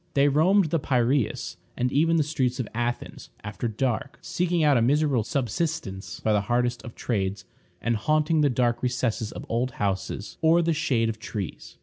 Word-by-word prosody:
They 140 +1 +5
roamed 165 +4 +3
the 165 - +2
Piræus, 130 -2 0 0.2
and 125 +1 0
even 165 +4 +3
the 160 - +3
streets 135 -4 -1
of 125 - -2
Athens, 120 +1 -3
after 105 +3 -3
dark, 125 +4 -2
eking 175 -2 0
out 145 -2 +5
a 120 - +4
miserable 140 -1 +2
subsistence 125 - -3
by 110 - +2
the 105 - +3
hardest 120 +3 0
of 120 - -10
trades, 100 -4 -2 0.4
and 120 0 +1
haunting 155 +7 +2
the 145 - +4
dark 120 -2 +1
recesses 125 -3 -1
of - - -8
old 120 +2 -1
houses 100 -1 -3
or 165 +2 +5
the 165 0 +2
shade 140 -8 +1
of 110 -1 -4
trees. 105 -5 -6
125 Hz, 180 wpm, -26 LUFS, 115-150 Hz, 0.4 s, They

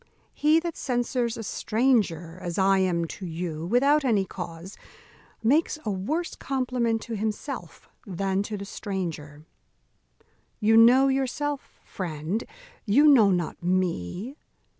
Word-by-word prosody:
He 310 +2 +3
that 335 -1 -4
censures 245 -2 -1
a 225 - -5
stranger, 200 -8 0
as 175 -1 -4
I 195 0 +4
am 175 -3 +1
to 185 +3 -8
you, 165 -1 -4
without 280 +8 +3
any 215 -7 +2
cause, 175 +1 -8 0.7
makes 300 +7 +2
a 215 - 0
worse 295 - -2
compliment 250 -4 -1
to 230 - -5
himself 215 0 -5 0.2
than 195 +1 -1
to 210 +1 -4
the 200 - -6
stranger. 160 -8 -5 1.1
You 220 +1 +4
know 245 +4 +7
yourself, 275 +2 -2
friend; 175 +4 -4 0.4
you 260 +9 +4
know 240 -9 +7
not 175 -4 -1
me. 185 - -2
210 Hz, 125 wpm, -26 LUFS, 180-255 Hz, 1.1 s, know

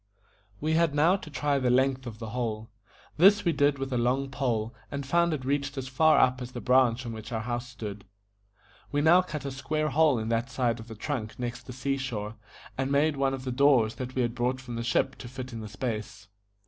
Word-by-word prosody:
We 155 +1 0
had 165 -2 +2
now 160 +5 +5
to 155 - -10
try 145 0 0
the 130 -2 +1
length 130 +1 +2
of 110 -2 -7
the 110 -1 -7
hole. 115 -3 -3 0.5
This 200 +5 +6
we 170 - +4
did 145 -1 +2
with 135 0 -4
a 125 - +1
long 130 +3 0
pole, 120 -4 -1 0.2
and 140 -1 -4
found 170 +4 +2
it 140 -5 -3
reached 140 +1 -1
as 130 -1 -3
far 155 +5 +4
up 130 0 +3
as 125 0 -7
the 120 - -4
branch 125 -1 +3
on 115 - -4
which 110 0 -8
our 110 -1 -2
house 120 +1 -3
stood. 105 -5 -7 0.9
We 145 - +1
now 170 +4 +6
cut 150 -6 -6
a 140 - -3
square 155 +3 -1
hole 150 -3 +4
in 110 0 -3
that 115 +2 0
side 125 -2 0
of 110 - -10
the 110 - -8
trunk 110 -2 -4
next 120 0 -5
the - - -6
sea 135 +2 -1
shore, 110 -5 -4 0.5
and 135 +1 0
made 145 +2 +3
one 135 -1 +1
of 130 - -9
the 130 - -3
doors 125 -4 +4
that 130 0 -6
we 130 - +2
had 120 -1 -1
brought 125 +2 -1
from 125 -2 -7
the 115 - -3
ship 120 +3 0
to 125 - -9
fit 130 0 -7
in 115 - -5
the 110 -1 -7
space. 110 0 -5
130 Hz, 235 wpm, -28 LUFS, 120-140 Hz, 0.9 s, This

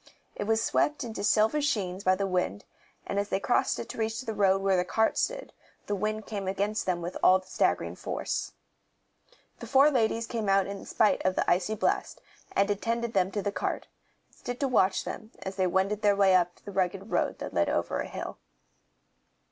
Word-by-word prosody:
It 205 - -3
was 225 +1 +2
swept 295 +5 +1
into 225 -4 -5
silver 220 +8 +3
sheens 200 -10 -1
by 185 0 +4
the 195 +1 -1
wind, 180 - -1 0.4
and 200 - -1
as 200 0 -2
they - - 0
crossed 245 - +1
it - - -5
to - - -7
reach 225 +2 -1
the 230 -3 -4
road 195 -2 +2
where 195 -1 +3
the 180 - +2
cart 220 +4 +1
stood, - - -2 0.3
the 205 - -2
wind 215 +1 -2
came 200 -3 -4
against 200 +2 -1
them 175 -2 -1
all 185 - +6
with 185 0 -13
staggering - - 0
force. - - -3 1.1
The - - -8
four 275 +3 +5
ladies 230 -3 +1
came 225 -3 -3
out 195 0 +4
in 200 0 -6
spite 215 - +2
of 185 0 +1
the - - 0
icy 185 +5 +2
blast, - - -1 0.3
and 200 - +3
attended 230 +3 -1
them 185 -2 +2
to 205 0 -3
the 205 - -1
cart, 185 - -3 0.4
and - - -27
stood 245 0 -5
to 275 - +2
watch 190 -7 +2
them 220 - -7
as 190 0 -5
they 185 -1 +2
wended 190 +3 0
their 205 -1 +4
way 195 -1 +4
up 175 -1 +3
the 205 - -6
rugged 195 +2 -1
road - - 0
that - - -6
led - - +2
over - - -1
a - - -3
hill. - - -6
200 Hz, 205 wpm, -28 LUFS, 190-220 Hz, 1.1 s, all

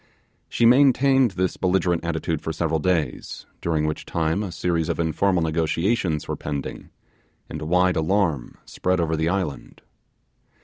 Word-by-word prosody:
She 120 - +1
maintained 135 +1 +5
this 95 0 0
belligerent 90 -2 +1
attitude 80 -1 -2
for 80 - -3
several 80 0 -1
days, 80 -6 -2 0.2
during 80 -2 0
which 75 0 -3
time 80 +3 -1
a 100 -4 -4
series 85 -1 -1
of - - -2
informal 85 +2 +1
negotiations 80 +2 0
were - - -2
pending, 70 -2 -6 0.6
and - - -7
wide 90 +3 +2
alarm 80 -5 0
spread 90 0 -1
over 80 -1 0
the 80 +1 0
island. 90 -6 -4
85 Hz, 140 wpm, -23 LUFS, 80-95 Hz, 0.6 s, maintained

